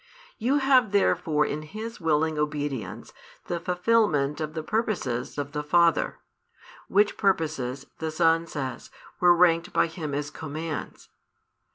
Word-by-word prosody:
You 255 Hz, +6 st, +2 dB
have 260 Hz, -6 st, +3 dB
therefore 165 Hz, -6 st, +2 dB
in 150 Hz, -, -3 dB
His 215 Hz, +8 st, -8 dB
willing 160 Hz, -1 st, +1 dB
obedience 145 Hz, -9 st, -3 dB, 0.3 s
the 175 Hz, -, -3 dB
fulfilment 180 Hz, -5 st, +1 dB
of 155 Hz, 0 st, -4 dB
the 160 Hz, -, -3 dB
purposes 175 Hz, -, -2 dB
of 145 Hz, 0 st, -3 dB
the 150 Hz, -, -2 dB
Father; 170 Hz, +3 st, +2 dB, 0.7 s
which 205 Hz, +1 st, +2 dB
purposes, 150 Hz, -, 0 dB
the 160 Hz, -, -2 dB
Son 165 Hz, +1 st, +2 dB
says, 135 Hz, -5 st, -5 dB, 0.3 s
were 175 Hz, -1 st, +6 dB
ranked 170 Hz, 0 st, +3 dB
by -, -, +4 dB
Him 160 Hz, -3 st, -5 dB
as 145 Hz, 0 st, -3 dB
commands. 155 Hz, +1 st, -6 dB
160 Hz, 135 wpm, -26 LUFS, 150-180 Hz, 0.7 s, were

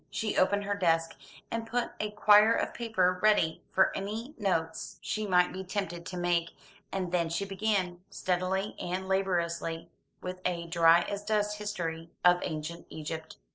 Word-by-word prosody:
She 220 Hz, -2 st, -2 dB
opened 205 Hz, +2 st, +3 dB
her 205 Hz, 0 st, -1 dB
desk, 165 Hz, -4 st, +1 dB, 0.4 s
and 230 Hz, 0 st, -3 dB
put 240 Hz, +1 st, -1 dB
a 215 Hz, -, -1 dB
quire 210 Hz, +1 st, +6 dB
of -, -, -1 dB
paper 185 Hz, -6 st, +1 dB
ready 210 Hz, -7 st, +3 dB
for 190 Hz, -, +3 dB
any 220 Hz, +8 st, -4 dB
notes 165 Hz, -6 st, -1 dB
she 215 Hz, -1 st, -3 dB
might 180 Hz, -1 st, +3 dB
be 190 Hz, +1 st, -5 dB
tempted 180 Hz, -3 st, -4 dB
to 180 Hz, -, -5 dB
make, 175 Hz, -1 st, 0 dB, 0.4 s
and 185 Hz, -2 st, -2 dB
then 170 Hz, -2 st, +1 dB
she 170 Hz, +4 st, -1 dB
began, 195 Hz, -3 st, -1 dB
steadily 185 Hz, +2 st, -1 dB
and 185 Hz, +2 st, -3 dB
laboriously, 170 Hz, -4 st, -1 dB, 0.3 s
with 180 Hz, 0 st, -6 dB
a 170 Hz, -2 st, -1 dB
dry 170 Hz, 0 st, +5 dB
as 200 Hz, +3 st, -4 dB
dust 210 Hz, 0 st, 0 dB
history 165 Hz, -6 st, -4 dB, 0.2 s
of 180 Hz, 0 st, +7 dB
ancient 160 Hz, +2 st, -5 dB
Egypt. 160 Hz, +1 st, -6 dB
185 Hz, 160 wpm, -30 LUFS, 170-205 Hz, 0.4 s, of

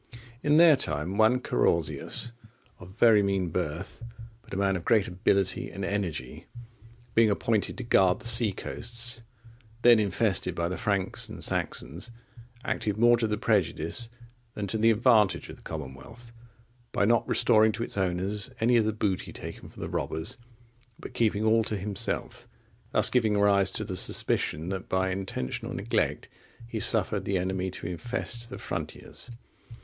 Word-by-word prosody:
In 150 Hz, +1 st, +3 dB
their 165 Hz, -2 st, +8 dB
time, 80 Hz, -, -2 dB
one 110 Hz, +4 st, +4 dB
Carausius,(47) 120 Hz, -1 st, -1 dB, 0.5 s
of 90 Hz, -, -11 dB
very 115 Hz, -3 st, +6 dB
mean 95 Hz, -3 st, 0 dB
birth, 85 Hz, +5 st, -4 dB, 0.4 s
but -, -, -21 dB
a 95 Hz, -, -4 dB
man 100 Hz, -1 st, +1 dB
of 90 Hz, -, -4 dB
great 110 Hz, -1 st, +3 dB
ability 95 Hz, +1 st, +1 dB
and 100 Hz, -1 st, -5 dB
energy, 85 Hz, -11 st, -4 dB, 0.7 s
being 115 Hz, -1 st, +4 dB
appointed 105 Hz, +1 st, 0 dB
to 125 Hz, -, -5 dB
guard 95 Hz, -6 st, +3 dB
the -, -, -9 dB
sea 115 Hz, -2 st, +6 dB
coasts, 120 Hz, +4 st, -4 dB, 0.6 s
then 120 Hz, -2 st, +7 dB
infested 100 Hz, -1 st, 0 dB
by 85 Hz, 0 st, -1 dB
the 90 Hz, -, -3 dB
Franks 100 Hz, -4 st, -1 dB
and -, -, -7 dB
Saxons, 75 Hz, -, -2 dB, 0.6 s
acted 105 Hz, -1 st, -2 dB
more 120 Hz, +1 st, +5 dB
to 115 Hz, -1 st, 0 dB
the 105 Hz, 0 st, -1 dB
prejudice 105 Hz, +1 st, 0 dB, 0.5 s
than 105 Hz, -, -3 dB
to 105 Hz, +3 st, -1 dB
the 115 Hz, +1 st, +4 dB
advantage 110 Hz, -3 st, +3 dB
of -, -, -9 dB
the -, -, -20 dB
commonwealth, 80 Hz, -, -9 dB, 0.6 s
by 100 Hz, -, +1 dB
not 115 Hz, +1 st, +2 dB
restoring 110 Hz, -2 st, +4 dB
to 115 Hz, -, -3 dB
its -, -, -3 dB
owners 95 Hz, +3 st, -2 dB
any 120 Hz, +2 st, +3 dB
of 110 Hz, -, +3 dB
the 110 Hz, -, 0 dB
booty 100 Hz, -3 st, -2 dB
taken -, -, -9 dB
from -, -, -9 dB
the -, -, -3 dB
robbers, 80 Hz, +10 st, -3 dB, 0.6 s
but -, -, -10 dB
keeping 110 Hz, -2 st, +1 dB
all 110 Hz, +1 st, +3 dB
to 105 Hz, -1 st, -2 dB
himself; 100 Hz, +3 st, -2 dB, 0.4 s
thus -, -, +4 dB
giving 110 Hz, -4 st, +2 dB
rise 100 Hz, -2 st, +4 dB
to 110 Hz, -, -1 dB
the 95 Hz, -3 st, -5 dB
suspicion 80 Hz, -1 st, 0 dB
that 95 Hz, -1 st, -5 dB
by 95 Hz, 0 st, +1 dB
intentional 95 Hz, -9 st, -4 dB
neglect -, -, -1 dB, 0.4 s
he 115 Hz, -1 st, -4 dB
suffered 105 Hz, -2 st, +3 dB
the 95 Hz, 0 st, 0 dB
enemy 95 Hz, +1 st, -2 dB
to 95 Hz, -, -7 dB
infest 115 Hz, +6 st, -4 dB
the 130 Hz, -, -7 dB
frontiers. -, -, -6 dB
105 Hz, 160 wpm, -27 LUFS, 95-115 Hz, 0.7 s, their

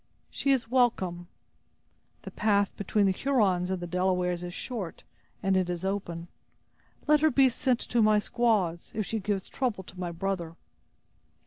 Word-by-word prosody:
"She 275 Hz, -, -2 dB
is 260 Hz, -4 st, +2 dB
welcome." 190 Hz, -9 st, +1 dB, 1.0 s
"The -, -, -8 dB
path 205 Hz, -2 st, +1 dB
between 205 Hz, +1 st, +1 dB
the 195 Hz, -, +4 dB
Hurons 190 Hz, -6 st, +1 dB
and 190 Hz, -1 st, -1 dB
the 175 Hz, -, -5 dB
Delawares 180 Hz, 0 st, 0 dB
is 175 Hz, -, -5 dB
short 195 Hz, -3 st, -5 dB, 0.4 s
and 195 Hz, -1 st, +2 dB
it 185 Hz, -1 st, +1 dB
is 175 Hz, +1 st, -3 dB
open; 175 Hz, -4 st, -3 dB, 0.8 s
let 300 Hz, 0 st, +5 dB
her 315 Hz, +1 st, +4 dB
be 270 Hz, -1 st, +5 dB
sent 250 Hz, 0 st, 0 dB
to 235 Hz, -, +1 dB
my 215 Hz, 0 st, +5 dB
squaws, 210 Hz, -7 st, 0 dB
if 215 Hz, -2 st, -1 dB
she 225 Hz, -, -2 dB
gives 195 Hz, -1 st, -2 dB
trouble 240 Hz, -8 st, -2 dB
to 185 Hz, 0 st, -13 dB
my 175 Hz, -2 st, -3 dB
brother." 170 Hz, -2 st, -3 dB
195 Hz, 160 wpm, -28 LUFS, 180-230 Hz, 1.0 s, let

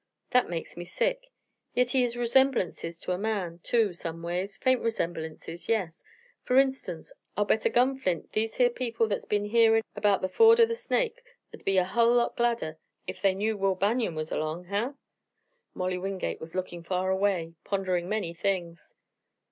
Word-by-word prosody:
That 250 Hz, -1 st, +3 dB
makes 170 Hz, -2 st, -5 dB
me 175 Hz, -, -6 dB
sick. -, -, -1 dB, 0.5 s
Yit 250 Hz, 0 st, +2 dB
he 260 Hz, -, +3 dB
has 240 Hz, -1 st, 0 dB
resemblances 240 Hz, -9 st, +1 dB
ter 180 Hz, -, -5 dB
a 180 Hz, -, -3 dB
man, 195 Hz, -6 st, -2 dB
too, 225 Hz, -3 st, +2 dB
some 165 Hz, -1 st, -6 dB
ways 180 Hz, +4 st, -3 dB
faint 255 Hz, -1 st, +2 dB
resemblances, 165 Hz, -5 st, -4 dB
yes. 190 Hz, -7 st, -1 dB, 0.4 s
Fer 250 Hz, -, +2 dB
instance, 265 Hz, -11 st, 0 dB, 0.2 s
I'll 205 Hz, -, +2 dB
bet 220 Hz, +1 st, +1 dB
a -, -, +5 dB
gun 260 Hz, +2 st, +2 dB
flint 180 Hz, -9 st, -2 dB
these 220 Hz, +1 st, -1 dB
here 245 Hz, -1 st, +4 dB
people 230 Hz, -2 st, -1 dB
that's 205 Hz, -, -2 dB
been 205 Hz, 0 st, 0 dB
hearin' 225 Hz, +1 st, +4 dB
erbout 205 Hz, -2 st, +2 dB
the -, -, +2 dB
ford 455 Hz, -, +6 dB
o' 460 Hz, -, +8 dB
the 460 Hz, -, -3 dB
Snake'd -, -, -1 dB, 0.5 s
be 195 Hz, -1 st, +2 dB
a 185 Hz, -, +5 dB
hull 235 Hz, +6 st, +3 dB
lot 240 Hz, -1 st, +2 dB
gladder 235 Hz, -10 st, -1 dB, 0.3 s
ef -, -, -6 dB
they 195 Hz, -2 st, +3 dB
knew 215 Hz, +3 st, 0 dB
Will 195 Hz, -1 st, +1 dB
Banion 205 Hz, -1 st, 0 dB
was 155 Hz, 0 st, -4 dB
erlong. 155 Hz, +3 st, -3 dB
Huh?" 205 Hz, +9 st, -1 dB, 0.8 s
Molly 185 Hz, 0 st, -1 dB
Wingate 190 Hz, 0 st, -3 dB
was 160 Hz, +2 st, -9 dB
looking 180 Hz, -2 st, -4 dB
far 185 Hz, +2 st, -1 dB
away, 190 Hz, -4 st, 0 dB
pondering 185 Hz, -3 st, -1 dB
many 210 Hz, -6 st, -2 dB
things. 170 Hz, -2 st, -3 dB
200 Hz, 180 wpm, -28 LUFS, 175-240 Hz, 0.8 s, o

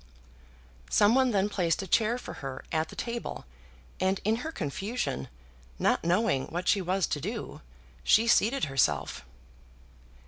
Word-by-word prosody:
Some 205 Hz, +2 st, +5 dB
one 260 Hz, 0 st, +4 dB
then 200 Hz, -3 st, +2 dB
placed 180 Hz, -3 st, 0 dB
a -, -, -5 dB
chair 225 Hz, +6 st, +2 dB
for -, -, -8 dB
her 135 Hz, -1 st, -6 dB
at 160 Hz, 0 st, 0 dB
the -, -, -10 dB
table, 235 Hz, -, -5 dB, 0.5 s
and 190 Hz, +1 st, +1 dB
in 220 Hz, +2 st, +2 dB
her 315 Hz, +6 st, -5 dB
confusion, 195 Hz, -, -3 dB, 0.5 s
not -, -, +1 dB
knowing 175 Hz, -5 st, +1 dB
what 175 Hz, +2 st, -4 dB
she 200 Hz, -, +4 dB
was 185 Hz, 0 st, +1 dB
to 145 Hz, -, -3 dB
do, 215 Hz, -, -5 dB, 0.4 s
she 220 Hz, -, +5 dB
seated 235 Hz, +3 st, +3 dB
herself. 75 Hz, -, 0 dB
195 Hz, 145 wpm, -29 LUFS, 160-230 Hz, 0.5 s, Some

